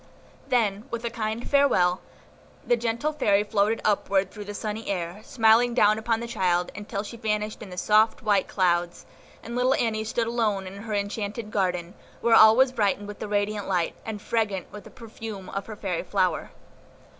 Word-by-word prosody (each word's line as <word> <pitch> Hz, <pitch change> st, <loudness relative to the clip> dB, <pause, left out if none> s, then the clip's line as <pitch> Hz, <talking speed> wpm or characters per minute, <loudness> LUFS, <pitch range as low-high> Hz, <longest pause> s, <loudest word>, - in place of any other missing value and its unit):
Then, 215 Hz, -3 st, +1 dB
with 235 Hz, 0 st, -4 dB
a 235 Hz, -, -2 dB
kind 220 Hz, 0 st, -3 dB
farewell, 190 Hz, -11 st, +3 dB, 0.6 s
the 240 Hz, -, +3 dB
gentle 235 Hz, +6 st, -1 dB
Fairy 205 Hz, -9 st, +2 dB
floated 210 Hz, +1 st, +1 dB
upward 195 Hz, -2 st, +1 dB
through 210 Hz, -2 st, -8 dB
the 205 Hz, 0 st, -7 dB
sunny 215 Hz, +1 st, -4 dB
air, 180 Hz, +1 st, -3 dB
smiling 235 Hz, +1 st, +3 dB
down 215 Hz, -2 st, +4 dB
upon 225 Hz, 0 st, 0 dB
the 235 Hz, -, -4 dB
child, 180 Hz, -5 st, 0 dB
until 205 Hz, 0 st, -4 dB
she 230 Hz, +2 st, -9 dB
vanished 210 Hz, -1 st, -2 dB
in 210 Hz, -, -8 dB
the 180 Hz, -, -9 dB
soft, 215 Hz, +4 st, +3 dB
white 205 Hz, -3 st, +2 dB
clouds, 175 Hz, -2 st, 0 dB, 0.4 s
and 235 Hz, +2 st, -6 dB
little 255 Hz, +2 st, +3 dB
Annie 220 Hz, -2 st, 0 dB
stood 230 Hz, +1 st, -1 dB
alone 220 Hz, -4 st, 0 dB
in 190 Hz, +1 st, -8 dB
her 215 Hz, +1 st, -4 dB
enchanted 205 Hz, +2 st, -3 dB
garden, 180 Hz, -3 st, -1 dB, 0.3 s
where 235 Hz, -, +2 dB
all 220 Hz, 0 st, +8 dB
was 260 Hz, +1 st, +4 dB
brightened 205 Hz, -3 st, 0 dB
with 205 Hz, -, -8 dB
the -, -, -5 dB
radiant 205 Hz, 0 st, -1 dB
light, 180 Hz, -3 st, 0 dB
and 220 Hz, -2 st, -5 dB
fragrant 205 Hz, -5 st, -1 dB
with 210 Hz, -, -10 dB
the -, -, -11 dB
perfume 220 Hz, -4 st, -9 dB
of 195 Hz, 0 st, -5 dB
her 220 Hz, -, -7 dB
fairy 190 Hz, -4 st, -3 dB
flower. 185 Hz, -3 st, 0 dB
210 Hz, 185 wpm, -26 LUFS, 195-225 Hz, 0.6 s, all